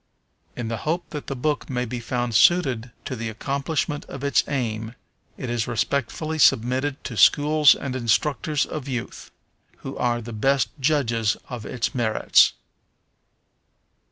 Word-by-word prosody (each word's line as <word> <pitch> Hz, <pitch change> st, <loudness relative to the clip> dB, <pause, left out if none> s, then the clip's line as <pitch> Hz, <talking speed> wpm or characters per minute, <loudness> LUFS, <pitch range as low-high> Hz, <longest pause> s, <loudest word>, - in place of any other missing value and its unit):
In 120 Hz, -2 st, -4 dB
the 115 Hz, 0 st, -3 dB
hope 170 Hz, +7 st, -3 dB
that 150 Hz, -2 st, -6 dB
the 135 Hz, -, -3 dB
book 150 Hz, +4 st, -2 dB
may 125 Hz, -2 st, -1 dB
be 120 Hz, +1 st, -5 dB
found 120 Hz, 0 st, -2 dB
suited 125 Hz, -, +3 dB, 0.2 s
to 130 Hz, -, -4 dB
the 115 Hz, -1 st, -4 dB
accomplishment 140 Hz, +5 st, -2 dB
of 135 Hz, 0 st, -9 dB
its 140 Hz, -, +3 dB
aim, 115 Hz, -4 st, -3 dB, 0.4 s
it -, -, -5 dB
is 120 Hz, -2 st, -1 dB
respectfully 140 Hz, +6 st, -2 dB
submitted 130 Hz, +3 st, +2 dB
to 125 Hz, -, -6 dB
schools 150 Hz, +5 st, +5 dB
and 135 Hz, -2 st, -5 dB
instructors 140 Hz, +4 st, +1 dB
of 150 Hz, -3 st, -6 dB
youth, 125 Hz, -3 st, -5 dB, 0.6 s
who -, -, -5 dB
are 120 Hz, -1 st, 0 dB
the 120 Hz, 0 st, -8 dB
best 135 Hz, +5 st, +1 dB
judges 120 Hz, -7 st, +1 dB
of 120 Hz, -5 st, -6 dB
its 125 Hz, +1 st, -2 dB
merits. 115 Hz, -4 st, +3 dB
125 Hz, 145 wpm, -24 LUFS, 115-145 Hz, 0.6 s, schools